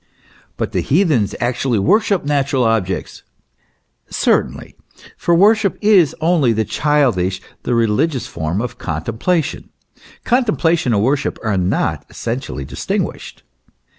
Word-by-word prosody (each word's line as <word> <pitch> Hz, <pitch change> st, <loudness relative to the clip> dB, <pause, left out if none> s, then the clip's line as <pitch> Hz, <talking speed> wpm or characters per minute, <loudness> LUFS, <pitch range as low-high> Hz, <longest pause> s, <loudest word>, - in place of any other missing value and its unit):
" -, -, -31 dB
But -, -, -2 dB
the -, -, 0 dB
heathens 140 Hz, -, +1 dB
actually 125 Hz, 0 st, 0 dB
worshipped 200 Hz, -, +2 dB
natural 140 Hz, -2 st, +1 dB
objects." 110 Hz, -5 st, -1 dB, 0.9 s
Certainly; -, -, 0 dB, 0.4 s
for 170 Hz, -, +1 dB
worship 205 Hz, +2 st, +3 dB
is 200 Hz, -7 st, +4 dB
only 160 Hz, -7 st, +2 dB
the 110 Hz, 0 st, 0 dB
childish, 120 Hz, -, +1 dB, 0.2 s
the 120 Hz, -, -1 dB
religious 120 Hz, +5 st, +1 dB
form 80 Hz, +6 st, -3 dB
of 125 Hz, -, -6 dB
contem 80 Hz, +8 st, -4 dB
plation. 170 Hz, -3 st, 0 dB, 0.6 s
Contemplation 175 Hz, -, +1 dB
and 100 Hz, -, +1 dB
worship 135 Hz, +4 st, 0 dB
are 105 Hz, -3 st, 0 dB
not 90 Hz, 0 st, 0 dB
essentially 115 Hz, -, -5 dB
dis 65 Hz, -1 st, -8 dB
tinguished. -, -, -3 dB
130 Hz, 125 wpm, -18 LUFS, 105-165 Hz, 0.9 s, is